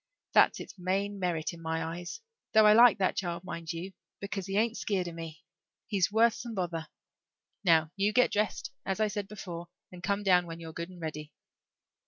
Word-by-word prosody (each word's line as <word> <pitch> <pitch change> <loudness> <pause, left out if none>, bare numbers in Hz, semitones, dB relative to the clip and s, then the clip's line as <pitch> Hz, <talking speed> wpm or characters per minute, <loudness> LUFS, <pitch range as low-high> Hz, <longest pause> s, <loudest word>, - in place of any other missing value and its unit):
That's - - +5
its - - -10
main 195 +3 -1
merit 175 -3 -1
in 170 - -11
my 160 0 -2
eyes, 175 - -6 0.3
though 220 0 +7
I 210 - +8
like 235 0 +7
that 190 -2 +1
child, 175 -2 -3
mind 170 -2 -5
you, 175 +3 -6 0.3
because 200 -1 -4
he 195 +1 -1
ain't 230 +1 +2
skeered 190 -6 -1
of 170 - -6
me. 165 -2 -8 0.4
He's 200 -3 +1
worth 225 +1 +5
some 235 -1 -7
bother. 170 -4 -3 0.8
Now, 160 -4 +4
you 200 +1 +2
get 250 +3 +4
dressed, 210 +1 -1
as 195 +1 -2
I 215 - +3
said 205 -1 -4
before, 175 -5 -7 0.2
and 180 -1 -10
come 200 +2 0
down 180 -3 +4
when 165 0 -7
you're 165 -1 -8
good 170 +2 -5
and 180 -1 -12
ready." 155 -2 -6
185 Hz, 200 wpm, -30 LUFS, 170-205 Hz, 0.8 s, I